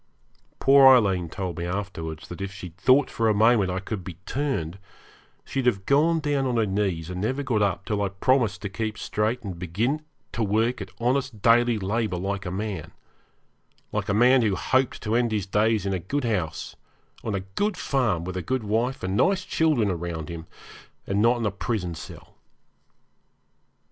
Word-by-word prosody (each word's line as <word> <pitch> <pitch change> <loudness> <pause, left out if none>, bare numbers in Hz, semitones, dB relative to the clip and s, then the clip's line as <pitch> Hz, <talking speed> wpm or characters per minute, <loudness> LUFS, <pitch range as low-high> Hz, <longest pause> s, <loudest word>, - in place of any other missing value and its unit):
Poor 135 0 +7
Aileen 100 -10 +5
told 90 -1 -4
me - - -3
afterwards 85 -5 -5
that 90 - -7
if 100 0 -3
she'd 90 -3 -9
thought 130 +8 +4
for 115 -1 +1
a 105 - +2
moment 110 -2 +4
I 90 +1 -1
could 100 0 -5
be 85 -1 -7
turned 115 - -2 0.7
she'd 135 -2 -2
have 100 -6 +1
gone 160 +4 +3
down 145 -3 0
on 125 -2 0
her 115 - +3
knees 95 -4 -1
and 90 0 -4
never 130 +7 -1
got 115 -6 0
up 100 -1 0
till 105 -2 -1
I 100 - 0
promised 105 -1 +1
to - - -1
keep 110 +2 -3
straight 110 +4 -1
and 95 -5 -6
begin 110 - -1 0.3
to 115 - -3
work 110 +3 +1
at 95 - -6
honest 125 -2 -1
daily 120 0 +4
labour 105 -1 -1
like 100 +1 -3
a - - -3
man 95 -4 -4 1.0
like - - -2
a - - +2
man 125 +3 +5
who 105 -4 +1
hoped 130 +4 0
to 105 - -1
end 120 -1 +2
his 105 -3 -1
days 105 +1 +1
in 100 - 0
a 95 - -1
good 140 - -2
house, 90 - -2 0.5
on 110 -3 -2
a 95 - -2
good 95 - -2
farm, 115 - 0
with 95 0 -5
a 90 - -2
good 130 +4 -2
wife 115 +5 -1
and 95 +1 -1
nice 185 - +2
children 150 -10 +2
round 85 -2 -4
him, 85 -1 -7 0.6
and 100 +1 0
not 120 +2 +4
in 115 - -2
a 105 - +1
prison 95 -3 -3
cell. 80 - -11
105 Hz, 190 wpm, -25 LUFS, 95-125 Hz, 1.0 s, Poor